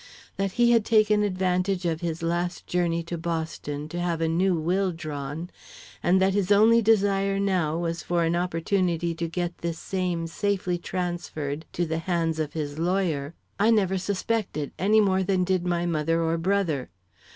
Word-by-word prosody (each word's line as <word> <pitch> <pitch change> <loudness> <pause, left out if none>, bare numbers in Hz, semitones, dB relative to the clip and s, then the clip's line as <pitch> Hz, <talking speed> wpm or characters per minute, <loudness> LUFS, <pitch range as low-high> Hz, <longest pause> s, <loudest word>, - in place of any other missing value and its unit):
That 195 -1 -1
he 240 -1 +4
had 230 -2 +4
taken 215 -1 +3
advantage 185 -1 0
of 165 -1 -1
his 165 -1 -3
last 175 +1 -2
journey 170 -1 0
to 170 0 -5
Boston 160 -3 -4
to 175 - -4
have 175 -2 -1
a 165 - +1
new 180 +3 +2
will 180 +4 0
drawn, 155 +1 -6 0.5
and 185 +2 +3
that 190 0 +3
his 200 -1 0
only 220 +3 +6
desire 200 -2 +2
now 180 -6 +1
was 170 0 -2
for 175 -1 0
an 165 +1 +1
opportunity 175 0 0
to 170 0 -3
get 175 +1 -3
this 170 -1 -3
same 180 -3 -2
safely 180 0 -1
transferred 170 -5 -4
into 175 - -1
the 160 0 -2
hands 165 -2 -1
of 155 -2 -2
his 150 -1 -4
lawyer, 170 -4 0 0.2
I 210 +3 +4
never 195 -4 +2
suspected 200 -6 -2
any 210 +5 +4
more 190 -2 +2
than 185 -1 +1
did 180 -1 0
my 175 0 0
mother 165 0 0
or 165 0 +1
brother. 170 -7 0
175 Hz, 175 wpm, -26 LUFS, 165-195 Hz, 0.5 s, only